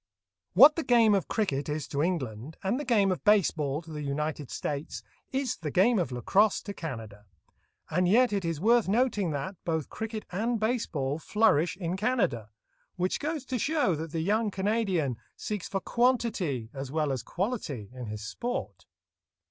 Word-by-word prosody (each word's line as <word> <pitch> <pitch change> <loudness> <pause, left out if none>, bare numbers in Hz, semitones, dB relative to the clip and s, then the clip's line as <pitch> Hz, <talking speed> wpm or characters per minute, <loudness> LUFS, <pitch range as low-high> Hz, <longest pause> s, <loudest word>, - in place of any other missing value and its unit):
* 85 -3 -63
What 280 - +8
the 325 - 0
game 230 -5 +5
of 195 -3 +1
cricket 150 -11 -1
is 150 -1 -3
to 140 - -1
England, 145 - -2
and 200 +7 0
the - - -3
game 210 -7 +3
of 180 - -3
base 210 -3 +5
ball 150 0 -2
to 160 - -12
the 150 -1 -5
United 150 0 -3
States, 145 0 -4 0.3
is 265 -2 -1
the 155 -2 -4
game 200 - +4
of 165 -8 -1
lacrosse 190 - +2
to 200 - -5
Canada; 110 - -7 0.6
and 180 +3 +1
yet 235 +4 +4
it 200 -2 0
is 165 -3 -2
worth 230 +4 +4
noting 210 -3 +1
that, 150 +6 -4
both 160 -3 -2
cricket 220 -1 -5
and 225 +5 0
base 225 +2 0
ball 140 -1 -2
flourish 180 -4 +2
in 175 -1 -2
Canada, 200 - 0 0.5
which 180 0 -1
goes 300 -2 -3
to 255 -1 -2
show 290 - +2
that 160 0 -4
the 165 - -2
young 210 +5 +1
Canadian 190 - 0 0.2
seeks 210 -3 -4
for 195 - -2
quantity 215 - 0
as 135 -1 -6
well 155 -2 0
as 130 -3 -2
quality 155 - -3
in 125 -2 -7
his 105 0 -6
sport. 235 - -5
180 Hz, 180 wpm, -28 LUFS, 145-220 Hz, 0.6 s, What